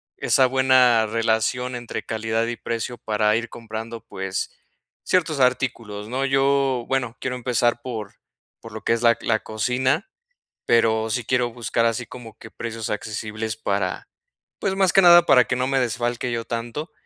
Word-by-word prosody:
esa 130 - +3
buena 130 -3 +4
relación 115 +3 0
entre 120 -1 -5
calidad 110 +1 -1
y 120 - -3
precio 115 +1 -4
para 105 -1 +1
ir 120 +1 -2
comprando, 115 0 -7
pues 95 -3 -4 0.5
ciertos 160 -6 +1
artículos, 115 -5 0
¿no?, 130 +4 -2
yo, 135 -2 +2
bueno, 125 -4 -1
quiero 125 -1 -3
empezar 120 -1 0
por 110 -5 -6 0.5
por 115 - -11
lo 110 0 -7
que - - +2
es 115 - -1
la 120 -1 +6
c - - -11
la 110 -1 +2
cocina, 125 - 0 0.6
pero 110 -1 +2
sí 120 +1 -2
quiero 125 -1 +1
buscar 115 0 -1
así 115 +1 0
como 115 -3 -11
que 110 - -12
precios 115 -1 -6
accesibles 110 +1 -4
para 100 -3 -2 0.5
pues, 190 -1 -1
más 190 -2 +3
que 195 - +6
nada 175 -1 +8
para 125 -5 +6
que 125 - -1
no 125 - 0
me 135 0 +1
desfalque 120 0 -1
yo 115 -1 -2
tanto, 120 +7 -5
120 Hz, 170 wpm, -23 LUFS, 110-130 Hz, 0.6 s, nada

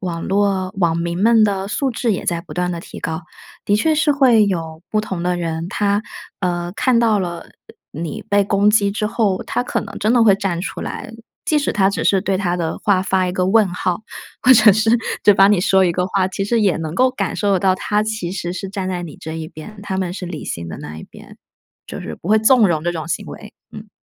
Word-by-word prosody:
网 170 -3 -4
络 195 -1 0
网 170 -3 +2
民 170 +2 -2
们 225 0 +5
的 195 -2 +1
素 265 +6 -1
质 230 -1 -1
也 - - -3
在 170 -1 -1
不 - - -11
断 180 0 -1
地 170 - -4
提 170 - -10
高。 160 0 -4 0.4
的 205 - +2
确 310 +9 +2
是 305 -1 +2
会 245 -7 +4
有 165 -4 -3
不 215 - +1
同 190 -5 -5
的 180 0 0
人， 165 0 -3
他， 205 0 0 0.4
呃， 175 -2 -2
看 255 -2 +2
到 220 -3 +3
了， 175 -2 -3
呃， - - -15 0.5
你 165 -3 -5
被 205 0 +3
攻 200 +1 +3
击 205 -2 +3
之 210 0 -1
后， 210 -5 0
他 245 - -2
可 - - -2
能 - - -8
真 215 +3 +1
的 240 -2 +4
会 205 -3 +6
站 190 -4 -2
出 - - -5
来。 225 - -6 0.3
即 305 - +2
使 290 - -1
他 195 -2 +3
只 200 - -2
是 195 -2 +3
对 195 -1 -1
他 180 -2 -1
的 165 -2 -2
话 200 -3 +2
发 190 -1 +1
一 180 - -2
个 185 0 0
问 215 +1 +4
号， 180 +2 -2 0.4
或 255 - +7
者 220 -3 +7
是， 220 +2 +2 0.3
就 205 - +8
帮 195 +1 +5
你 205 - +3
说 190 -2 +4
一 180 - +3
个 180 +2 -1
话， 190 -1 0
其 195 +1 -3
实 230 +2 +1
也 195 -6 +2
能 160 0 -5
够 255 +3 +3
感 255 - -3
受 200 -3 +1
到 185 0 +2
他 210 +2 0
其 215 -5 -3
实 175 -2 -4
是 190 +1 -5
站 195 -1 -4
在 180 -1 -3
你 165 -4 -9
这 160 - -7
一 160 -1 -5
边， 200 +7 -11
他 190 -2 -4
们 180 -2 -2
是 185 -1 -6
理 170 -3 -6
性 85 0 -5
的 80 - -7
那 75 +1 -8
一 - - -9
边。 - - -15 0.5
就 - - -7
是 - - -6
不 170 - -9
会 215 +1 +5
纵 220 -1 +5
容 160 -1 -1
这 175 - 0
种 160 -1 -5
行 165 - -2
为， 210 -1 -11 0.2
嗯。 215 0 -10
195 Hz, 265 characters per minute, -19 LUFS, 175-215 Hz, 0.5 s, 就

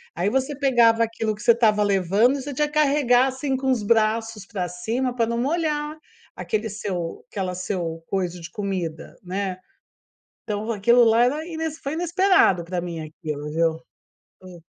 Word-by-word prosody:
aí 180 +4 0
você 265 +5 -1
pegava 235 -5 +4
aquilo 225 -1 -2
que 210 - -13
você 240 - +6
estava 220 -3 +3
levando 200 +6 +2
e - - -5
você 285 +1 -6
tinha 300 +3 +1
que 295 - -14
carregar, 275 -4 +4
assim, 265 +1 -2
com 265 0 -1
os 250 -5 +1
braços 220 -1 +1
pra 190 -4 -3
cima 230 +9 -2
pra 235 -2 +1
não 235 0 -2
molhar 300 +2 -1 0.4
aquele 220 +1 -2
seu 190 -5 -5
aquela 185 -2 -3
seu 175 -3 -4
coiso 180 -2 -2
de 165 0 -9
comida, 185 -5 -4
né, 190 0 -3 0.9
então 215 0 -3
aquilo 235 +3 +4
lá 225 +1 +4
era 295 +5 -1
ines 320 -2 -4
foi 280 -2 -5
inesperado 345 - +3
pra 175 0 -3
mim 170 -2 -5
aquilo, 150 -1 -6
viu? 165 0 +1 0.7
Hum. 180 -2 -12
220 Hz, 170 wpm, -23 LUFS, 185-265 Hz, 0.9 s, você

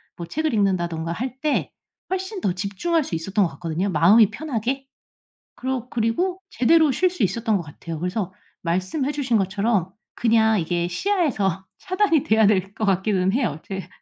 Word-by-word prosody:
뭐 170 - -6
책을 315 - -1
읽는다든가 175 -5 0
할 255 +8 -4
때 305 -2 0 0.4
훨씬 380 +2 -3
더 185 - +1
집중할 205 - -1
수 270 - -8
있었던 195 +5 +1
것 170 - -3
같거든요 175 +3 -2
마음이 195 +7 +6
편하게. 270 -1 -3 0.7
그러 255 -1 -3
그리고 255 +13 0
제대로 315 +4 +4
쉴 365 +8 +2
수 360 -6 -7
있었던 220 +3 +1
것 180 - -4
같아요. 160 +1 -8
그래서 180 +2 -2 0.3
말씀해 185 - -1
주신 265 -5 0
것처럼 195 -1 0 0.2
그냥 220 -2 +3
이게 170 +1 -1
시야에서 205 - 0
차단이 370 -5 +2
돼야 220 0 +4
될 195 -1 +1
것 220 - -1
같기는 190 -1 +2
해요. 230 - 0
제 190 -1 -6
215 Hz, 345 characters per minute, -23 LUFS, 185-270 Hz, 0.7 s, 마음이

